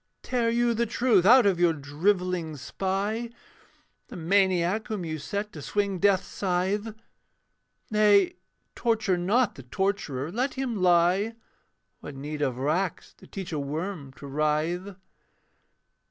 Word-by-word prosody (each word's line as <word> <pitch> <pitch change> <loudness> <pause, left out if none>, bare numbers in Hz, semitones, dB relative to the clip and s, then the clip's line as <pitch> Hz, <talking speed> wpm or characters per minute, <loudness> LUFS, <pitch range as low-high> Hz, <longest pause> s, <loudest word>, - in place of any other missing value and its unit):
Tear 240 -2 0
you 235 0 +2
the 235 +1 0
truth 220 -5 +3
out 250 +1 +8
of 190 -3 +2
your 175 -2 +4
drivelling 165 +2 -1
spy, 200 - -2 0.8
The - - -10
maniac 185 +3 +1
whom 210 -6 -3
you 155 -1 -4
set 205 +7 -4
to 150 - -8
swing 200 +4 -1
death's 195 -1 +3
scythe. 200 +4 -2 1.0
Nay; 205 -3 +4 0.4
torture 220 -5 +1
not 205 +7 +1
the - - -11
torturer 155 -1 -2
let 255 +7 -1
him 260 -3 -2
lie: 180 +5 +3 0.6
What 145 - -9
need 150 +2 -6
of 130 -4 0
racks 160 +7 -1
to - - -18
teach 190 -3 -7
a 150 - -1
worm 150 +1 -4
to 140 - -12
writhe? 155 +7 -1
190 Hz, 135 wpm, -27 LUFS, 160-210 Hz, 1.0 s, out